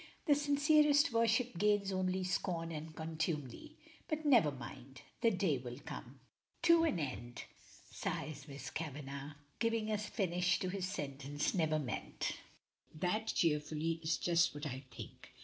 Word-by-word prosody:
"The 300 - +6
sincerest 290 0 +4
worship 230 -3 +2
gains 205 -1 +3
only 185 0 0
scorn 175 -2 -1
and 155 0 -6
contumely. 160 -5 -3 0.3
But 310 -1 -2
never 240 - +6
mind! 130 0 -9 0.2
the 230 - +5
day 180 - +1
will 125 -1 -7
come! 140 -3 -8 0.2
" - - -44
"To 335 0 +7
an 260 - +1
end," 120 - -4 0.5
says 145 -1 -4
Miss 140 -1 -7
Kavanagh, 140 -2 -5 0.3
giving 230 -1 +1
a 210 - +1
finish 180 -4 +1
to 185 - 0
his 185 -1 -2
sentence 145 -5 -2
never 160 -4 +2
meant. 135 -7 -3 0.6
"That," 185 +7 0
cheerfully, 155 +1 +1
"is 160 0 +1
just 170 -5 +3
what 145 +1 -5
I 130 -1 -5
think. 120 - -10
165 Hz, 145 wpm, -36 LUFS, 145-210 Hz, 0.6 s, To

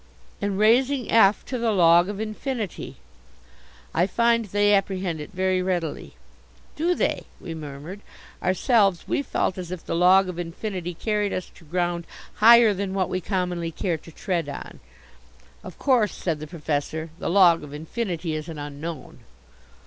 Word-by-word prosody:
"And 200 -1 -1
raising 245 +5 +3
F 210 -3 +5
to 255 - -4
the 230 -1 +1
log 175 -1 +5
of 205 -1 -5
infinity. 220 - -4 1.0
I 175 +3 +2
find 235 +2 +2
they 205 +1 +2
apprehend 190 -5 0
it 150 - -8
very 185 0 0
readily." 175 -4 -3 0.6
"Do 345 +4 +1
they?" - - -1
we 165 - -7
murmured. 155 +4 -8 0.4
Ourselves 195 0 +2
we - - 0
felt 190 -8 -1
as 180 -2 -6
if 180 -2 -7
the - - -3
Log 185 +2 +5
of 180 -1 -5
Infinity 175 0 -5
carried 210 +1 -1
us 185 - -4
to 165 - -18
ground 175 +1 -2 0.3
higher 230 0 +7
than 195 0 -3
what 190 -2 0
we 185 - -2
commonly 180 -3 -2
care 165 0 -2
to 165 - -14
tread 170 -3 -2
on. 140 - -8 0.8
"Of 185 - -10
course," 245 -7 +2
said 165 -4 -2
the 155 - -7
Professor, 155 0 -3
"the - - -2
Log 175 -3 +5
of 145 - -10
Infinity 165 +2 -4
is 155 +1 -5
an 160 - -7
Unknown." 145 +1 -7
185 Hz, 160 wpm, -24 LUFS, 165-205 Hz, 1.0 s, higher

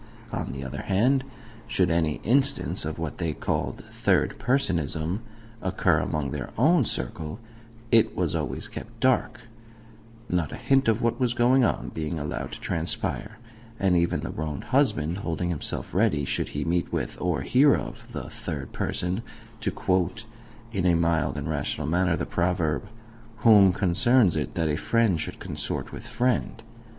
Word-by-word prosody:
On - - -3
the 70 -1 -6
other 65 +2 -5
hand, 125 +8 +2 0.4
should 90 -2 +2
any 80 -2 +2
instance 135 - +2
of 80 - -4
what 80 -1 -4
they 85 -3 -1
called - - -2
"third - - +1
personism" 85 - 0 0.4
occur 95 - +2
among 75 -3 -2
THEIR 70 -2 -4
OWN 150 +3 +4
circle, 80 - -4 0.5
it 115 -1 +4
was 90 -4 0
always 75 -6 -2
kept 115 0 -9
dark 130 -1 +2 0.9
not 85 -5 0
a - - -5
hint 135 -2 +2
of 115 0 +2
what 115 +2 +1
was 125 -2 +1
going 125 +2 +4
on - - 0
being 80 +1 -3
allowed 75 0 -4
to - - -7
transpire, 95 +5 -2 0.4
and 95 -2 +3
even 85 0 +2
the - - -4
wronged 75 -2 -4
husband 80 +5 +2
holding 90 -1 -2
himself 80 - -3
ready, 90 -8 +2
should - - -1
he - - -3
meet 85 +1 0
with, - - -3
or 90 -6 0
hear 135 - +5
of, - - -7
the - - -5
"third 70 -3 -6
person," 90 +5 -2 0.4
to - - -1
quote, 95 +4 0 0.5
in 95 -3 +1
a 85 - +5
mild 85 -1 +1
and - - -3
rational 75 - -2
manner, 90 +2 +2
the - - -2
proverb, 85 -1 0 0.6
"Whom 100 -4 +8
concerns 100 +3 +3
it 75 -5 -2
that 80 -2 +1
a 75 -1 0
friend 110 -8 +2
should - - -5
consort - - -4
with - - -8
friend?" 125 -2 0
90 Hz, 160 wpm, -26 LUFS, 80-115 Hz, 0.9 s, Whom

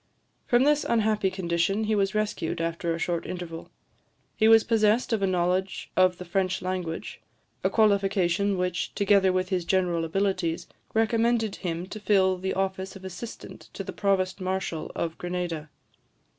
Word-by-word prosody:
From 240 +1 +4
this 295 +1 +3
unhappy 215 -3 +1
condition 185 +2 0
he 215 0 0
was 195 -1 +1
rescued, 210 -7 -1
after 170 0 -2
a 165 - -1
short 170 0 -2
interval. 170 -2 -6 0.7
He 220 - +3
was 225 0 +7
possessed 225 +1 +2
of 220 - +1
a 195 - +2
knowledge 185 +1 -1
of 185 -1 +4
the 180 - -8
French 185 +1 -1
language; 180 -3 -4 0.4
a - - +3
qualification 200 -2 +2
which, 180 -1 -2
together 200 -2 +4
with 185 0 -1
his 185 -2 0
general 175 -2 +1
abilities, 185 -1 -1 0.3
recommended 225 -1 +2
him 170 -1 -3
to 215 +3 -8
fill 190 -3 +3
the 190 +1 -2
office 190 0 -2
of 190 -1 -10
assistant 190 +5 -9
to - - -5
the - - -7
Provost 190 -1 0
Marshal 185 -3 -3
of 165 -1 -3
Grenada. 175 -3 -3
190 Hz, 155 wpm, -27 LUFS, 180-205 Hz, 0.7 s, was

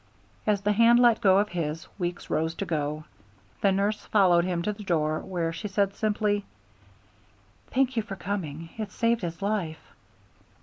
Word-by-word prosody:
As 205 -2 +2
the 205 +1 +1
hand 230 +3 +5
let 240 -2 +5
go 190 -1 +5
of 205 +1 +2
his, 165 -2 -3
Weeks 175 -1 -3
rose 160 +1 0
to 200 - -3
go. 150 -2 -2 0.6
The 200 - +4
nurse 200 +2 0
followed 180 -4 +4
him 175 -2 -1
to 210 - -1
the 210 - -11
door, 155 -5 0
where 170 -3 -3
she 210 +6 -5
said 200 0 0
simply: 205 -1 0 1.2
"Thank 260 -1 +1
you 225 - +2
for 210 -2 -7
coming. 165 -5 -5
It 210 -3 -4
saved 230 +2 +1
his 170 +1 -5
life." 195 -7 -3
195 Hz, 170 wpm, -27 LUFS, 170-210 Hz, 1.2 s, hand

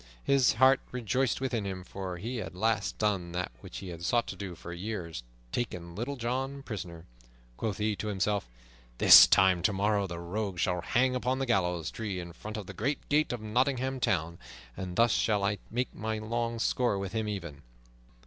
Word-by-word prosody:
His 140 -2 +4
heart 130 +3 +5
rejoiced 125 +1 0
within 125 -5 -1
him, 95 -2 -4
for 95 -1 -6
he 120 +7 -4
had 110 - -3
at - - -12
last 110 +3 0
done 95 -5 0
that 90 +1 -2
which - - -9
he 95 - -7
had 85 -1 -8
sought 120 +7 +2
to - - -5
do 95 -3 -6
for 85 +1 -8
years, 90 - -5 0.3
taken 90 -8 -3
Little 120 +9 -3
John 135 +3 -3
prisoner. 85 -8 -7 0.5
Quoth 105 - -3
he 105 0 0
to 105 - -4
himself, 100 -5 -1 0.5
"This - - +10
time 95 -2 +4
tomorrow 100 +1 +1
the 85 -1 -6
rogue 95 +3 -3
shall 90 0 0
hang 125 +7 +2
upon 125 +1 0
the 135 - -1
gallows 90 -8 0
tree 105 -5 -4
in 85 -1 -7
front 110 +5 -7
of 105 - -5
the 100 - -8
great 130 +10 -2
gate 150 +1 +3
of 120 -2 -4
Nottingham 130 +3 0
Town, 85 -6 0 0.4
and 90 -1 -5
thus 115 +2 +4
shall 105 -2 +2
I 100 0 0
make 125 +3 -2
my 110 +1 -3
long 115 +2 -2
score 115 -1 +1
with 95 -1 -4
him 110 -1 -1
even." 85 -8 -5
105 Hz, 195 wpm, -30 LUFS, 90-120 Hz, 0.5 s, This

